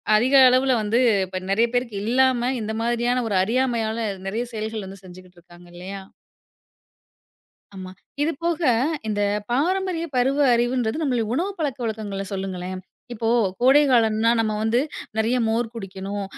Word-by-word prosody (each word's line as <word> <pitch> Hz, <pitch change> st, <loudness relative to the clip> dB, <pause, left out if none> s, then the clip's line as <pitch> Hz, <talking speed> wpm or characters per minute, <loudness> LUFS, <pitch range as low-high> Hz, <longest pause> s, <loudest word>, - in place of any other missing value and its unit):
அதிக 255 Hz, +6 st, +3 dB
அளவுல 255 Hz, +1 st, +3 dB
வந்து 225 Hz, +4 st, +1 dB, 0.3 s
இப்ப 185 Hz, 0 st, -5 dB
நிறைய 230 Hz, +4 st, +3 dB
பேருக்கு 240 Hz, -4 st, -1 dB
இல்லாம, 255 Hz, +1 st, +2 dB, 0.2 s
இந்த 215 Hz, +1 st, -4 dB
மாரியான 240 Hz, +1 st, 0 dB
ஒரு 195 Hz, -, +1 dB
அறியாமையால 230 Hz, -1 st, -1 dB, 0.2 s
நிறைய 230 Hz, +5 st, -2 dB
செயல்கள 215 Hz, -3 st, -5 dB
செஞ்சுட்டு 180 Hz, 0 st, -14 dB
இருக்காங்க 175 Hz, +1 st, -17 dB
இல்லயா! 190 Hz, +2 st, -7 dB, 1.7 s
ஆமா. 185 Hz, -1 st, -8 dB, 0.3 s
இதுபோக 330 Hz, +2 st, -1 dB, 0.5 s
இந்தப் 205 Hz, 0 st, -1 dB
பாரம்பரிய 350 Hz, +5 st, 0 dB
பருவ 265 Hz, +3 st, +2 dB, 0.2 s
அறிவுன்றது 240 Hz, 0 st, 0 dB
நம்ம 260 Hz, -4 st, 0 dB, 0.2 s
உணவு 360 Hz, +7 st, -1 dB
பழக்க 285 Hz, -5 st, -2 dB
வழக்கங்கள 210 Hz, -3 st, -4 dB
சொல்லுங்களேன்! 185 Hz, -1 st, -5 dB, 0.3 s
இப்போ 225 Hz, 0 st, -2 dB, 0.3 s
கோடை 265 Hz, +4 st, +6 dB
காலம்னா 225 Hz, -1 st, +3 dB
நம்ம 220 Hz, -1 st, +1 dB
வந்து 225 Hz, +2 st, +1 dB, 0.4 s
நிறைய 225 Hz, +3 st, +1 dB
மோர் 230 Hz, +1 st, 0 dB
குடிக்கணும், 195 Hz, -1 st, -6 dB
225 Hz, 130 wpm, -23 LUFS, 200-255 Hz, 1.7 s, கோடை